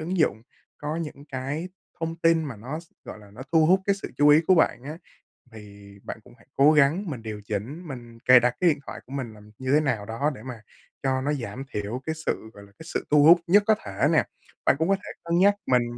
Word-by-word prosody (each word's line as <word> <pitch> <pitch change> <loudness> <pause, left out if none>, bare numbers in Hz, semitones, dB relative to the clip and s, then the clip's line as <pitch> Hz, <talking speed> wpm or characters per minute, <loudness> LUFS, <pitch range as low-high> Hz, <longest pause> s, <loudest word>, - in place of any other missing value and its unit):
ứng 175 +4 -3
dụng, 110 -8 +1 0.4
có 150 +2 -4
những 150 -3 -6
cái 140 +7 -4 0.3
thông 165 0 -3
tin 165 -1 +2
mà 135 -7 -6
nó 135 +9 -6
s 165 - -21
gọi - - -9
là, 105 -1 -16
nó 110 +6 -10
thu 160 -1 +5
hút 190 +2 +4
cái 200 - +3
sự 195 - -8
chú 145 +1 +5
ý 150 +2 +7
của 185 - +6
bạn 160 -7 +2
á, 155 +3 -7 0.5
thì 100 -2 -13
bạn - - -7
cũng - - -18
hãy - - -24
cố 140 +3 +6
gắng 155 +6 +3
mình 125 -6 -6
điều 110 -2 -7
chỉnh, 130 - -5
mình 120 -4 -9
cài 125 +1 +7
đặt 120 0 0
cái 180 - +4
điện 145 -2 0
thoại - - -7
của - - -17
mình 130 -5 -4
là 105 - -15 0.2
như 130 0 -2
thế 150 - +6
nào 120 -9 -1
đó 135 +8 -1
để - - -12
mà 125 -4 -8 0.4
cho 130 -1 0
nó 145 +3 -1
giảm 125 -2 -5
thiểu 105 +5 -4
cái 160 0 -2
sự, 110 - -2
gọi 100 - -13
là, 100 - -18
cái 160 - -11
sự - - -2
thu 150 -1 +6
hút 170 +3 +8
nhất 205 +4 +5
có 220 - +5
thể 95 -1 0
nè. - - +4 0.4
Bạn - - +4
cũng 165 - +1
có 195 - +4
thể 195 - -10
cân 170 0 0
nhắc 200 +2 +5
mình 125 -2 +3
140 Hz, 260 wpm, -25 LUFS, 115-165 Hz, 0.5 s, hút